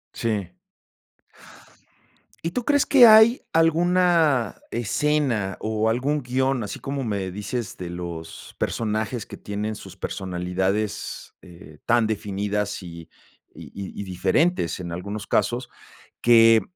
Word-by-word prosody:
Sí. 105 Hz, -, -2 dB, 1.9 s
¿Y 170 Hz, -, -3 dB
tú 245 Hz, -, -2 dB
crees 285 Hz, 0 st, +3 dB
que 255 Hz, -4 st, +8 dB
hay 220 Hz, +3 st, +7 dB
alguna 165 Hz, -, +3 dB
escena, 120 Hz, -4 st, 0 dB
o 110 Hz, 0 st, 0 dB
algún 140 Hz, +6 st, 0 dB
guion, 130 Hz, 0 st, 0 dB
así 105 Hz, -, -6 dB
como 135 Hz, -1 st, -4 dB
me 100 Hz, -4 st, -3 dB
dices, 105 Hz, +4 st, -4 dB
de 90 Hz, -2 st, -7 dB
los 85 Hz, -2 st, -7 dB
personajes 110 Hz, +1 st, -2 dB
que -, -, -10 dB
tienen 105 Hz, +1 st, -4 dB
sus -, -, -11 dB
personalidades, 95 Hz, +3 st, -3 dB
eh, 85 Hz, -4 st, -15 dB
tan 120 Hz, -1 st, +4 dB
definidas 105 Hz, -1 st, -2 dB
y 85 Hz, -1 st, -10 dB, 0.5 s
y -, -, -11 dB
y 100 Hz, 0 st, -7 dB
y -, -, -3 dB
diferentes 95 Hz, -, 0 dB
en 85 Hz, -2 st, -6 dB
algunos 100 Hz, +4 st, -5 dB
casos 120 Hz, +4 st, 0 dB, 0.5 s
que 115 Hz, -1 st, +6 dB
110 Hz, 120 wpm, -24 LUFS, 95-135 Hz, 1.9 s, que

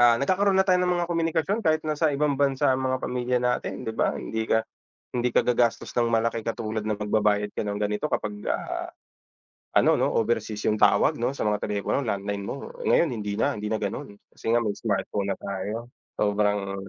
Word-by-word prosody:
ah, 120 Hz, -1 st, +7 dB
nagkakaroon 190 Hz, +7 st, +2 dB
na 190 Hz, -, +5 dB
tayo 180 Hz, -1 st, +4 dB
ng 180 Hz, -, +2 dB
mga 175 Hz, -, 0 dB
komunikasyon 165 Hz, +5 st, 0 dB
kahit 155 Hz, -2 st, +2 dB
na 155 Hz, -, 0 dB
sa 155 Hz, 0 st, +2 dB
ibang 145 Hz, 0 st, +1 dB
bansa 135 Hz, -1 st, +2 dB
ang 130 Hz, -, -2 dB
mga 130 Hz, 0 st, +1 dB
pamilya 125 Hz, 0 st, 0 dB
natin, 125 Hz, 0 st, -1 dB
di 110 Hz, -, -2 dB
ba? -, -, +1 dB
Hindi 110 Hz, 0 st, -3 dB
ka 110 Hz, -, +4 dB, 0.6 s
hindi 125 Hz, 0 st, +1 dB
ka -, -, +3 dB
gagastos 120 Hz, -1 st, +1 dB
ng 120 Hz, -1 st, +2 dB
malaki 115 Hz, 0 st, +1 dB
katulad 110 Hz, -1 st, -3 dB
ng 110 Hz, -1 st, -1 dB
pagbabayad 105 Hz, -1 st, +1 dB
ka -, -, -2 dB
ng 105 Hz, 0 st, -3 dB
ganito 105 Hz, 0 st, -1 dB
kapag, 105 Hz, 0 st, -1 dB, 0.2 s
ah, -, -, -3 dB, 0.9 s
ano -, -, +5 dB
'no, -, -, +3 dB
overseas 110 Hz, -2 st, 0 dB
yung 105 Hz, 0 st, 0 dB
tawag 105 Hz, +2 st, +4 dB
'no 125 Hz, +3 st, 0 dB
sa -, -, -2 dB
mga 105 Hz, -1 st, +1 dB
telepono 105 Hz, +6 st, -1 dB
landline 100 Hz, -1 st, -2 dB
mo 140 Hz, -, -6 dB, 0.2 s
ngayon 170 Hz, -, +4 dB
hindi 105 Hz, -3 st, -3 dB
na -, -, 0 dB
hindi 105 Hz, -, -3 dB
na 110 Hz, 0 st, -1 dB
ganun 100 Hz, 0 st, -4 dB, 0.2 s
kasi -, -, -10 dB
nga 120 Hz, -, +4 dB
may 105 Hz, -, 0 dB
smartphone 100 Hz, -1 st, -1 dB
na -, -, -10 dB
tayo 105 Hz, +5 st, -4 dB, 0.3 s
sobrang 105 Hz, -1 st, +1 dB
115 Hz, 205 wpm, -26 LUFS, 105-130 Hz, 0.9 s, ah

